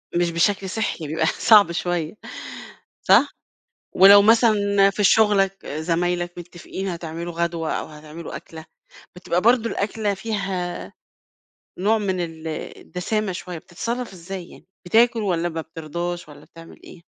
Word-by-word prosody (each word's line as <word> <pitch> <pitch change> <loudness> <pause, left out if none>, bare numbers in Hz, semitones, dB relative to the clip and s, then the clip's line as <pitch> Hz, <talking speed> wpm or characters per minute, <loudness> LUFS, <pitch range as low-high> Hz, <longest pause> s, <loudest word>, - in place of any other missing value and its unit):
مش 175 -1 +1
بشكل 190 +3 +1
صحّي، 185 -6 -3
بيبقى 160 +2 0
صعب 205 +2 +5
شوية 170 -2 -2 0.9
صح؟ - - +5 0.7
ولو 200 +2 +9
مثلًا 205 -3 +4
في 205 +1 -2
شُغلّك، 195 -2 +3
زمايلك 175 +3 -1
متفقين 175 +2 -7
هتعملوا 170 -1 -5
غدوة 170 -1 -2
أو - - -3
هتعملوا 155 +2 -9
أكلة، 160 -1 -11 0.5
بتبقى 180 0 -1
برضه 230 +1 +3
الأكلة 210 0 -1
فيها 195 -4 -4 0.9
نوع 210 +4 +2
من 190 -3 -1
ال 165 -2 -5 0.3
الدسامة 205 +3 -3
شوية، 180 -1 -6
بتتصرف 230 +8 -5
إزاي 180 0 -8
يعني، - - -16 0.2
بتاكل 230 +4 +4
والّا 175 -4 0
ما 165 -1 -4
بترضاش 170 +2 -5
والّا 150 - -14
بتعمل 165 0 -15
إيه؟ 170 - -14
180 Hz, 130 wpm, -22 LUFS, 170-200 Hz, 0.9 s, ولو